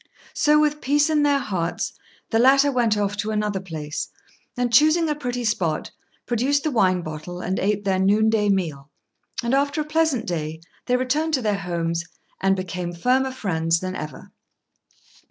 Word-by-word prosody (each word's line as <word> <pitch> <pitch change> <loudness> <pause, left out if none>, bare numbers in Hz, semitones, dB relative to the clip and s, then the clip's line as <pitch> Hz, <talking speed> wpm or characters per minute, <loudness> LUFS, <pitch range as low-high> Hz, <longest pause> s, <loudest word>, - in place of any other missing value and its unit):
So, 300 0 +4
with 300 0 +1
peace 295 +3 +2
in 300 -1 +3
their 290 -1 +3
hearts, 190 -10 -2 0.4
the 225 - +3
latter 275 +3 +5
went 235 -5 +2
off 205 0 0
to 210 +2 -2
another 210 -2 -1
place, 155 -5 -5 0.5
and, 245 -1 -1
choosing 310 +6 +5
a - - +2
pretty 245 -4 -4
spot, 185 -9 -1 0.3
produced 260 +4 +1
the 310 - 0
wine 185 -7 +2
bottle 155 +3 -7
and 185 +1 -2
ate 205 +1 0
their 190 -1 +1
noon 205 +3 +3
day 210 -2 +2
meal; 155 -8 -1 0.5
and 235 +2 0
after 280 +2 +1
a - - +1
pleasant 305 -6 +1
day, 160 -2 -3 0.3
they 250 0 +3
returned 300 +5 0
to 260 - -3
their 205 -2 0
homes, 170 -2 -2 0.4
and 195 0 +3
became 180 -2 -4
firmer 255 +9 +1
friends 165 -8 0
than 185 +1 -4
ever. 155 - -8
210 Hz, 170 wpm, -23 LUFS, 180-270 Hz, 0.5 s, latter